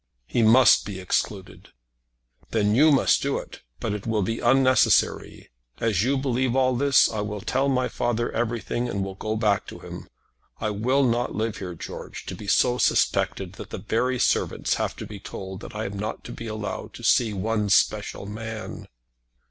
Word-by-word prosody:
"He 120 - 0
must 115 +2 +6
be 100 -2 -6
excluded." 90 - -3 0.8
"Then 105 -2 +1
you 150 +7 +6
must 140 - +3
do 140 0 0
it. - - -9 0.2
But 110 -3 -2
it 105 0 -5
will 110 -3 +1
be 115 +5 -2
unnecessary. 130 0 +2 0.3
As 110 -5 +1
you 135 +3 +1
believe 130 -2 0
all 130 -1 +3
this, 140 +2 +4
I 110 -2 -3
will 105 0 -4
tell 135 +6 0
my 130 -1 +1
father 120 -1 -1
everything 120 +1 -2
and 100 -3 -2
will 95 - -6
go 110 +3 -3
back 105 -2 +1
to - - -8
him. - - -10 0.5
I 110 -1 -1
will 125 +7 +1
not 120 -1 0
live 110 0 -2
here, 90 -3 -6
George, - - -8
to - - -5
be 105 - -10
so 125 +4 +3
suspected - - +1
that - - -9
the - - -5
very 125 +3 0
servants - - +1
have - - -2
to - - -7
be 105 -2 -9
told 95 -1 -7
that - - -10
I 110 +1 -3
am 100 0 -5
not 105 +2 -4
to - - -8
be 115 - -7
allowed 110 -1 -5
to - - -11
see 115 -3 +3
one 105 +1 -1
special 100 - +1
man." 110 +1 -7
115 Hz, 190 wpm, -25 LUFS, 105-125 Hz, 0.8 s, must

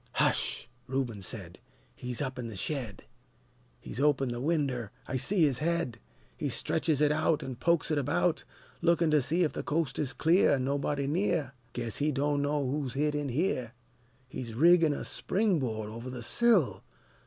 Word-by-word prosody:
"Hush!" - - +1 0.2
Reuben 125 -6 -2
said, 90 -2 -7 0.3
"He's 125 +2 -4
up 130 -2 -4
in 120 - -4
the 110 - -7
shed! 115 -2 -3 0.8
He's - - -7
opened 135 -3 +2
the 120 0 -4
winder, 135 -7 0 0.2
I - - -4
see 185 +7 +2
his 135 -5 +2
head! 165 -7 -1 0.4
He - - -2
stretches 155 -2 0
it 150 -1 +4
out, 155 0 +1
an' 130 -2 -6
pokes 170 +3 +1
it 150 - +2
about, 90 -10 +1 0.4
Lookin' 170 -1 +3
to 150 -1 +4
see 165 +8 +1
'f 155 - 0
the - - -3
coast 150 -3 -1
is 140 -3 -1
clear 170 +6 +4
An' 130 - -1
nobody 140 +1 -1
near: 160 -3 0 0.2
Guess 115 -3 -3
he 150 +1 +1
do'no' 145 0 0
who's 135 -1 -2
hid 150 +2 +1
in 145 -1 -2
here! 125 -4 -1 0.5
He's 120 -3 -6
riggin' 165 +3 +5
a - - -4
spring 200 -4 0
board 110 -5 -3
over 115 +3 -7
the 125 -2 -6
sill! 220 - +3
140 Hz, 175 wpm, -30 LUFS, 125-155 Hz, 0.8 s, riggin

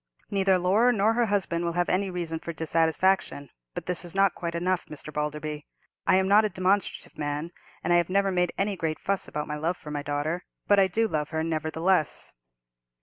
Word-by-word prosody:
Neither 195 -1 +3
Laura 200 +7 +3
nor 220 -1 +2
her 235 0 +2
husband 185 -4 0
will 170 0 -1
have 175 0 +1
any 190 +1 +1
reason 170 -3 -3
for 170 +1 -6
dissatisfaction. 160 -1 +1 0.2
But - - -5
this 180 0 -1
is 175 +1 -4
not 195 -1 +4
quite 170 -1 -4
enough, 180 +1 0
Mr. 155 0 -9
Balderby. 150 0 -3 0.4
I - - +5
am 190 0 +3
not 205 +2 +6
a 215 - +1
demonstrative 190 -2 -1
man, 150 +3 -3 0.3
and 175 - +2
I - - +6
have 175 0 +1
never 195 +1 +2
made 180 -1 +1
any 200 +1 0
great 160 -3 -2
fuss 195 -1 -1
about 150 0 -3
my 150 - -3
love 165 +4 -1
for 150 - -9
my 145 -1 -2
daughter; 145 +5 -2 0.2
but 205 -1 +5
I 190 - +5
do 225 +5 +1
love 150 -6 -2
her, 160 -1 -2
nevertheless." 160 +1 0
175 Hz, 205 wpm, -27 LUFS, 155-195 Hz, 0.4 s, not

